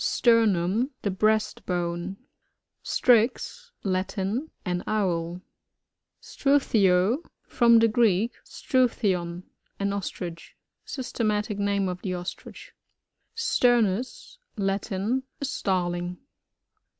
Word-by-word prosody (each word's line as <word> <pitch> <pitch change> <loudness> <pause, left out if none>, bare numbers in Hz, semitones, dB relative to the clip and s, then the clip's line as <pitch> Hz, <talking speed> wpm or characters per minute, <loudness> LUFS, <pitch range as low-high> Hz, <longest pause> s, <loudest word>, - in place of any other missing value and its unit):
Sternum.— 225 -1 +3
The 200 - 0
breast 215 +3 +1
bone. 175 +1 -2 0.6
Strix. 250 - +2
— - - -48
Latin. 195 +9 -2 0.2
An 180 0 -1
Owl. 175 -4 -1 0.8
Struthio. 220 -7 +2 0.2
— - - -57
From 235 -1 +7
the 230 0 +5
Greek, 220 -1 +2
s^oic. 255 -2 +1
thidn^ 180 -4 -1 0.4
an 200 0 0
Ostrich. 175 -3 -6 0.3
Systemadc 215 -5 -2
name 200 -1 +1
of 180 0 -4
the 185 -2 -2
Ostrich. 175 0 -8 0.6
Sturnus.— 245 - +1 0.2
Latin. 200 +4 -1 0.2
A 280 - -2
Starling. 180 -6 -1
200 Hz, 95 wpm, -26 LUFS, 180-235 Hz, 0.8 s, From